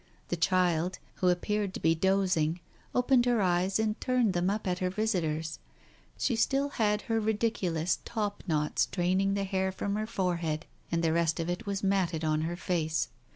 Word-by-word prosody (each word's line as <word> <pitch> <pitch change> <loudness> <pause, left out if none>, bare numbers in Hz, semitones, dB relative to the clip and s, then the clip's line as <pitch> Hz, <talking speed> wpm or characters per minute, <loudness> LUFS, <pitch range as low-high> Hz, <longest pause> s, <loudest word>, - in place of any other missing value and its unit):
The - - 0
child, 180 0 +1 0.2
who 180 - +3
appeared 200 +2 0
to - - -4
be 160 - +3
dozing, 180 -2 +1 0.4
opened 250 0 +4
her 240 -2 +3
eyes 185 0 +2
and 220 -1 -1
turned 250 -6 +2
them 175 +1 +1
up 210 +2 -2
at 180 -1 -1
her 185 - 0
visitors. 170 -6 -1 0.6
She 245 - +1
still 275 +5 +1
had 210 -5 0
her 225 -1 0
ridiculous 205 -6 0
top 210 -3 -3
knot 150 -2 0
straining 190 +2 +2
the 200 - 0
hair 190 -1 0
from 200 +1 -3
her 215 0 -2
fore 185 -6 0
head, 160 -1 -3 0.3
and 170 0 0
the 160 -1 +2
rest 165 -1 +1
of 165 +1 -1
it 190 +5 -5
was 200 0 -2
matted 185 -5 +1
on 155 0 +1
her 165 +2 -2
face. 165 -3 -1
185 Hz, 185 wpm, -30 LUFS, 170-210 Hz, 0.6 s, opened